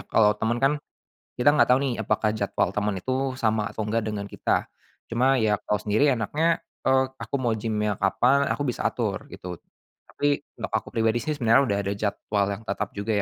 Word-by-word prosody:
kalau 105 -2 +4
temen 115 +2 +1
kan, 135 +4 +3 0.7
kita 145 +4 +5
nggak - - +5
tahu 125 - +5
nih 135 -3 0
apakah 110 +1 +1
jadwal 100 -3 0
temen 105 -2 0
itu 130 - -4 0.3
sama 110 -2 +1
atau 110 -1 -4
nggak 115 +1 0
dengan 100 -1 -3
kita, - - -1 0.4
cuma 130 +3 +2
ya 110 -2 +3
kalau 105 - 0
sendiri 110 +9 +2
enaknya, 150 +8 +1 0.2
eee, 130 0 +4
aku 140 - -5
mau 120 -3 +1
gym-nya 105 -1 -1
kapan 125 +9 +3
aku 145 - -1
bisa 125 - -2
atur - - -1
gitu, 90 -1 -7 0.6
tapi 145 0 0 0.2
untuk - - -4
aku - - -1
pribadi 115 +1 +1
sih 155 - -2
sebenarnya 125 -2 +4
udah 100 - +1
ada 100 0 -1
jadwal 100 0 -1 0.2
yang 110 - -16
tetap 100 +1 -2
juga 100 +2 -3
110 Hz, 190 wpm, -25 LUFS, 105-130 Hz, 0.7 s, kita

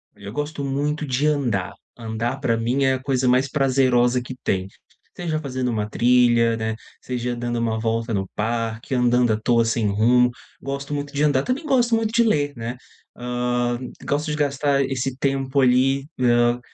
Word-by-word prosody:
Eu 100 0 -9
gosto 145 +2 -4
muito 145 +3 -1
de 135 +3 0
andar. 120 -11 0 0.2
Andar 115 +2 -3
pra 115 -4 +1
mim 120 +5 0
é 130 0 +3
a 130 - -2
coisa 130 -1 0
mais 130 +2 +3
prazerosa 130 -3 +2
que 130 +1 -8
tem. 95 -1 -1 0.5
Seja 160 -3 -2
fazendo 130 -4 -2
uma 105 -1 -2
trilha, 120 -1 +3
né, 110 0 -2 0.3
seja 125 -1 -3
dando 120 0 -2
uma 115 -1 -1
volta 115 +1 -1
no 95 -2 -1
parque, 115 +2 -2
andando 125 -1 +3
à 105 - -2
toa 115 +1 +3
sem 115 -1 0
rumo. 120 +5 +3 0.3
Gosto 140 +1 -5
muito 145 0 -4
de 145 +1 0
andar. 145 -3 +3
Também 275 +5 -2
gosto 240 -4 +3
muito 225 -1 0
de 235 0 +4
ler, 145 -10 +1
né. 120 +2 -5 0.4
Hã, 120 0 -1 0.3
gosto 150 +2 -1
de 150 - -1
gastar 140 -1 +1
esse 135 0 -2
tempo 135 0 0
ali, 130 +2 +3
hã, 120 -1 +3
125 Hz, 175 wpm, -22 LUFS, 115-140 Hz, 0.5 s, de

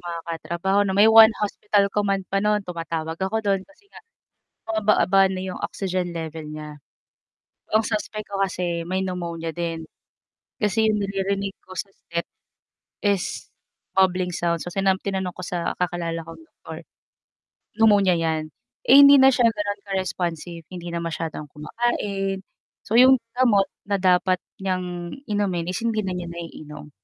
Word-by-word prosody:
mga 170 -1 -5
katrabaho 170 +4 -1
na 190 - 0
may 205 - +7
one 220 0 +9
hospital 205 -1 +1
command 200 -2 0
pa 195 - +1
no'n. 210 -1 +1
Tumatawag 165 -2 -4
ako 215 +3 -1
do'n 195 -1 +2
kasi 295 +7 -24
nga - - -12 0.7
bumababa 195 -3 +3
na 185 - -3
'yong 185 -1 -5
oxygen 185 -2 -2
level 160 -1 -6
niya. 150 0 -8 1.0
Ang 220 +1 +4
suspect 215 -1 -3
ko 200 -1 -4
kasi 175 -3 -2
may 185 +1 -1
pneumonia 170 -3 -4
din. 165 -2 -3 0.8
Kasi 215 +1 +2
yung 210 -1 +1
naririnig 195 0 -2
ko 185 - -11
sa 200 - -4
step 170 -3 -5 0.8
is 200 -3 -1 0.5
bubbling 185 -1 +3
sound. 170 -1 0
So, - - -5
sina 195 0 +2
tinanong 190 -2 -3
ko - - -8
sa 175 -1 -2
kakilala 170 -2 -2
kong 165 - -10
doktor, 325 - -11 0.9
pneumonia 205 -4 +5
'yan. 160 -1 -1 0.4
Eh, 280 - +9
hindi 280 0 +9
na 265 0 +7
siya 240 -2 +4
gano'n 205 -2 -3
ka-responsive, 175 -3 -3
hindi 175 -1 -7
na 170 - -1
masyadong 160 -2 -4
kumakain. 195 +3 -2 0.5
So, 220 - +1
'yong 260 +1 +7 0.2
gamot 220 -6 +4 0.2
na 200 - +2
dapat 185 0 +3 0.2
niyang 180 -2 -3 0.2
inumin 190 -5 -1
is 185 - -3
hindi 220 -2 0
na 190 - -2
niya 175 -1 -5
naiinom. 150 -3 -9
185 Hz, 150 wpm, -23 LUFS, 170-205 Hz, 1.0 s, one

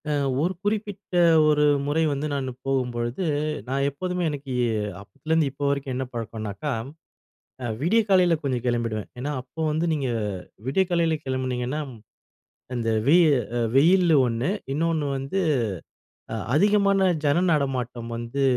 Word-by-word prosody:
அ - - +1 0.3
ஒரு 175 +4 +1
குறிப்பிட்ட 205 -2 -3 0.3
ஒரு 150 -1 +4 0.2
முறை 155 +3 +2
வந்து 140 +2 -2
நானு 135 -2 -2
போகும்பொழுது, 125 +3 -1 0.4
நான் 135 +2 0
எப்போதுமே 180 +5 -3
எனக்கு 140 -3 -5 0.5
அப்பலருந்து 150 +7 -1
இப்போ 145 +1 -4
வரைக்கும் 140 -1 -2
என்ன 130 +1 -2
பழக்கம்னாக்கா, 115 +4 -4 0.9
அ - - -2 0.2
விடிய 205 +9 +3
காலையில 180 -3 +5
கொஞ்சம் 130 -4 -1
கிளம்பிடுவேன். 115 -3 -1
ஏன்னா, 140 +4 -3
அப்போ 130 +5 -9
வந்து 160 +3 0
நீங்க 140 -4 -1 0.6
விடிய 190 +8 +3
காலையில 165 -2 +2
கிளம்புனீங்கன்னா, 130 +1 -2 0.9
அந்த 115 -2 -2 0.2
வெ 150 +5 +6 0.4
அ - - +1 0.2
வெயில் 175 +4 +5
ஒண்ணு 120 +6 -1 0.2
இன்னொன்னு 160 -1 0
வந்து 135 +8 -2 0.9
அ - - -2 0.2
அதிகமான 200 +2 +3 0.2
ஜன 170 +6 +3
நடமாட்டம் 125 -5 -2
வந்து 120 +4 -2
140 Hz, 130 wpm, -25 LUFS, 125-165 Hz, 0.9 s, வெ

